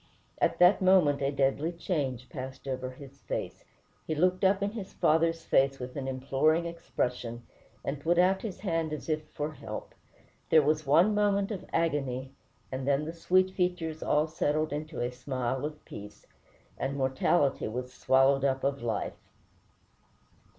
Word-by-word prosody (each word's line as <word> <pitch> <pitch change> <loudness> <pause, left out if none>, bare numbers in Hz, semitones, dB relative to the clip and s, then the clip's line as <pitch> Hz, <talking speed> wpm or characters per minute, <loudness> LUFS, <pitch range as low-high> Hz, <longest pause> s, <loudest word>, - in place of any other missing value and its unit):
At - - +2
that 180 +3 +6
moment 180 -7 +4
a 135 - +2
deadly 140 +3 +1
change 140 -8 -2
passed 130 0 -7
over 130 -1 -3
his 135 +1 -12
face. - - -4 0.4
He 155 - -1
looked 180 +4 +2
up 195 +1 +3
in 200 - 0
his 205 -4 -7
father's 165 +1 +2
face 135 0 +3
with 125 -1 -7
an 135 -2 -4
imploring 135 +5 +1
expression, 125 -8 -3 0.4
and 140 +1 -3
put 170 +3 +2
out 185 +2 +4
his 190 -5 -6
hand 165 -5 -1
as 150 - -6
if 155 0 -1
for 150 +1 -4
help. 110 -6 -7 0.6
There 155 -2 +6
was 155 0 +1
one 170 +9 +5
moment 205 0 +2
of 195 - -5
agony, 135 -5 -1 0.4
and 130 0 -4
then 140 +1 +2
the 160 - -5
sweet 185 +2 +2
features 180 -4 -1
all 150 +1 +2
settled 155 -1 -1
into 155 +2 -4
a 120 +1 -1
smile 130 +1 -3
of 150 0 -7
peace, 105 0 -10 0.5
and 140 +1 -2
"mortality 135 +2 +1
was 125 +3 -5
swallowed 135 +2 +3
up 135 -1 +1
of 140 0 0
life." 115 -3 -4
150 Hz, 160 wpm, -29 LUFS, 130-170 Hz, 0.6 s, that